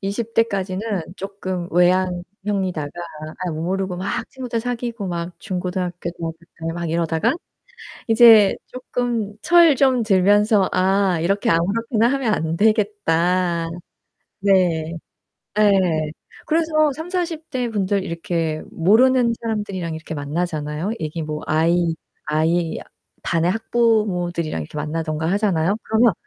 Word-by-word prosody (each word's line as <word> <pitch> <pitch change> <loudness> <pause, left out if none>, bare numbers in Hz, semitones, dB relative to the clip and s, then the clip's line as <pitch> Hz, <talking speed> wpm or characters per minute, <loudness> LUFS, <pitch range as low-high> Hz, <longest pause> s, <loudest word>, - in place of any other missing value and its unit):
20 215 +4 -4
대까지는 195 -4 0 0.4
쪼끔 185 -2 -5
외향형이다가 180 -1 0 0.5
아이 175 - -2
멋모르고 185 +3 -2
막 185 +2 -3
친구들 245 -3 -4
사귀고 235 -3 -4
막 170 0 -4
중고등학교, 180 -2 -3
대학교 165 -1 -5 0.3
때 165 - -1
막 170 0 -4
이러다가 165 -1 +1 0.8
이제 225 -3 +7
쪼끔 240 -4 -3
철 340 -4 +6
좀 255 -3 +3
들면서 205 0 +3
'아, 190 -1 +2
이렇게 195 +4 +1
아무렇게나 220 +7 +2
하면 260 -5 +1
안 160 -3 -1
되겠다.' 180 -5 +1 0.7
네. 175 -5 +2 0.6
예. 210 -1 +5 0.7
그래서 310 -2 +2
30-40 330 0 -4
대 250 -4 -1
분들 200 -3 0
이렇게 165 -2 -2
모르는 235 +7 +4
사람들이랑 205 -7 -3
이렇게 160 0 -7
만나잖아요. 155 +3 -3
이게 155 +1 -3
뭐 155 0 -4
아이 165 +2 +2 0.3
아이 160 +2 +1 0.4
반의 170 +1 +1
학부모들이랑 195 - 0
이렇게 75 - -10
만나든가 155 +1 -2
하잖아요. 195 -2 +1
그러면 225 0 +3
190 Hz, 275 characters per minute, -21 LUFS, 170-225 Hz, 0.8 s, 이제